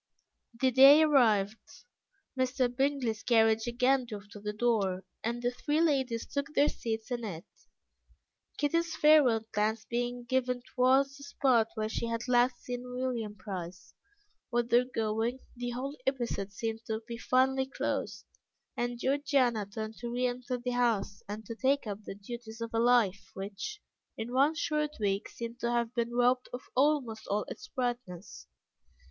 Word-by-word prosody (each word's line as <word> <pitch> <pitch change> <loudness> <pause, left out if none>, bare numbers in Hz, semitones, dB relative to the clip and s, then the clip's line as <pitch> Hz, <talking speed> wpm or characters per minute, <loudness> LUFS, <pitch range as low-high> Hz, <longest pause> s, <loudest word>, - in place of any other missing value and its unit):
The 260 0 +3
day 275 +5 +9
arrived, 220 - +2 0.5
Mr. 255 -1 0
Bingley's 265 -5 0
carriage 225 -1 +3
again 250 +2 +2
drove 205 -3 -8
to 205 - -9
the 210 +1 -3
door, 210 -4 0 0.2
and 235 +2 -2
the 245 - +1
three 295 +5 -1
ladies 265 -8 +1
took 280 -1 -3
their 290 - +5
seats 225 0 -4
in 240 -1 -2
it, 175 -6 -6 1.1
Kitty's 335 +3 0
farewell 275 -8 +5
glance 215 +1 0
being 245 0 -2
given 250 0 0
towards 270 +2 +3
the 280 - -12
spot 260 -5 +2
where 215 -1 -1
she 230 +1 -3
had 230 +1 -3
last 245 0 +2
seen 245 -1 -4
William 250 -4 -3
Price. 185 -2 -7 0.6
With 240 -1 0
their 240 +1 +5
going, 225 0 -1 0.2
the 245 0 -4
whole 260 +4 -4
episode 240 -7 -1
seemed 225 +2 -4
to 220 -1 -2
be 235 -1 -6
finally 265 +2 +2
closed, 270 - -3 0.5
and 240 0 -2
Georgiana 260 -6 +1
turned 220 +1 -6
to 240 - -5
re 245 +1 0
enter 250 0 -2
the 245 +1 -3
house, 230 -5 0
and 210 +1 -6
to 230 - -5
take 270 +5 +1
up 210 0 -6
the - - -6
duties 225 +2 -9
of 230 0 -5
a 225 - +1
life 230 -5 +3
which, 205 - -6 0.3
in 230 +2 -5
one 280 +5 +4
short 300 -2 -1
week, 200 -1 -1
seemed 235 +1 -7
to 235 - -1
have 235 -1 0
been 235 -1 -1
robbed 250 +1 +2
of 245 - -6
almost 260 -5 +1
all 205 +1 0
its 425 - -8
brightness. 240 - -4
240 Hz, 160 wpm, -30 LUFS, 220-260 Hz, 1.1 s, day